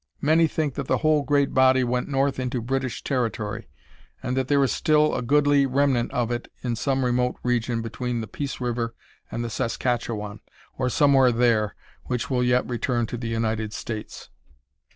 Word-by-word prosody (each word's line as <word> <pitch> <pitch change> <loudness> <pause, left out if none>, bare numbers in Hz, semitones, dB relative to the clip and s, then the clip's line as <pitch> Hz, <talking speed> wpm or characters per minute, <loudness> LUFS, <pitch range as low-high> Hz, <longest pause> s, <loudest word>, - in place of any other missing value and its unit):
Many 160 +3 +4
think 155 -2 -2
that 140 -1 -5
the - - +2
whole 155 -1 +4
great 140 0 +1
body 130 0 +5
went 125 0 -1
north 135 -1 0
into 125 0 -2
British 130 +1 -3
territory, 115 -6 -2 0.6
and 125 - -1
that 130 -1 0
there 140 0 +3
is 135 - +1
still 150 0 +3
a - - -1
goodly 145 +2 +3
remnant 135 -2 +1
of 120 -1 -1
it 120 0 -4
in 120 -2 -1
some 135 +2 0
remote 125 0 +1
region 120 -1 0
between 120 +1 -3
the 110 - -5
Peace 140 +6 -5
River 120 -2 -2 0.3
and 120 - -3
the 120 - -3
Saskatchewan, 115 -3 -2 0.4
or 130 -1 0
somewhere 135 -1 +4
there, 115 -3 +2 0.3
which 125 +1 -3
will 125 -1 +2
yet 125 0 +2
return 120 -1 -1
to 115 - -5
the 115 0 -5
United 110 -1 -1
States. 110 -1 -7
125 Hz, 175 wpm, -24 LUFS, 115-135 Hz, 0.6 s, body